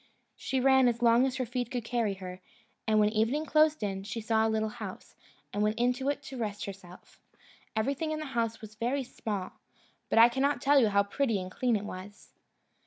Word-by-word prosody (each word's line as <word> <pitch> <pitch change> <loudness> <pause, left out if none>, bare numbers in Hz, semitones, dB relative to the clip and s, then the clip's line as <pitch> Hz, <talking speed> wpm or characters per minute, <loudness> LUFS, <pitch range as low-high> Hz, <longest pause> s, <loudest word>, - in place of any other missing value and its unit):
She 265 - -2
ran 265 0 +5
as 235 0 0
long 235 +2 +5
as 260 - -3
her 260 -1 -1
feet 245 0 -3
could 250 -3 -3
carry 230 -5 0
her, 185 -1 -8 0.5
and 215 -1 +3
when 210 0 +4
evening 230 +8 +1
closed 310 -2 +3
in, 195 -2 -2
she 205 +4 -5
saw 220 0 +2
a - - 0
little 220 0 0
house, - - -9 0.4
and 205 - -1
went 215 +1 +1
into 250 +3 +1
it 285 0 -2
to 270 -2 -8
rest 210 -3 -3
herself. 190 -2 -12 0.5
Everything 275 +8 -1
in 310 - -1
the 310 - -4
house 230 -2 -1
was 215 -1 -10
very 245 +6 -1
small, 205 -6 -5 0.5
but - - +1
I 230 +1 +9
cannot 265 +3 0
tell 285 +1 +5
you 235 - +4
how 200 0 +3
pretty 225 +1 0
and 185 0 -6
clean 245 +3 +1
it 205 -1 -2
was. 200 +1 -10
230 Hz, 210 wpm, -30 LUFS, 210-265 Hz, 0.5 s, I